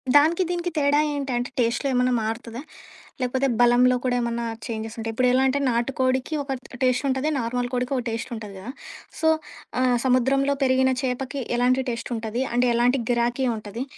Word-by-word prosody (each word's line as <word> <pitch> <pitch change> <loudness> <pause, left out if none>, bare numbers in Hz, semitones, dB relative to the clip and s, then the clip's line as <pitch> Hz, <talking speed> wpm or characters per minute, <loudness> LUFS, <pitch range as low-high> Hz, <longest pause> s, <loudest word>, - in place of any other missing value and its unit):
దానికి 320 +5 +5
దీనికి 350 0 -2
తేడా 290 0 +3
ఏంటంటే 260 -3 -2
టేస్ట్‌లో 240 +4 +1
ఏమన్నా 250 0 +2
మారుతదా? 230 +2 -4 0.6
లేకపోతే 260 +2 +1
బలంలో 245 +1 +5
కూడా 250 -1 +1
ఏమన్నా 235 0 -2 0.2
చేంజెస్ 220 -1 -5
ఉంటాయి. 225 0 -3
ఇప్పుడు 250 +3 +2
ఎలా 260 +1 +4
అంటే, 270 +2 +1
నాటుకోడికి 255 +3 0
ఒక 270 -1 -3 0.3
టేస్ట్ 255 0 +2
ఉంటది. 265 +3 0
నార్మల్ 245 +1 -2
కోడికి 250 +2 -1
ఒక 250 - -2
టేస్ట్ 230 +3 -4
ఉంటది 210 -3 -8
కదా! 220 +7 -7 0.5
సో, 320 - +3 0.5
ఆహ్, 250 -1 +3
సముద్రంలో 270 +2 +2
పెరిగిన 260 0 +3
చేపకి 265 +2 -2 0.2
ఎలాంటి 255 +2 +2
టేస్ట్ 235 +1 -5
ఉంటది? 225 +3 -2
అంటే 245 +1 +3
ఎలాంటి 245 +3 +3
గిరాకీ 240 +2 +1
ఉంటది. 215 +3 -6
250 Hz, 165 wpm, -24 LUFS, 235-265 Hz, 0.6 s, దానికి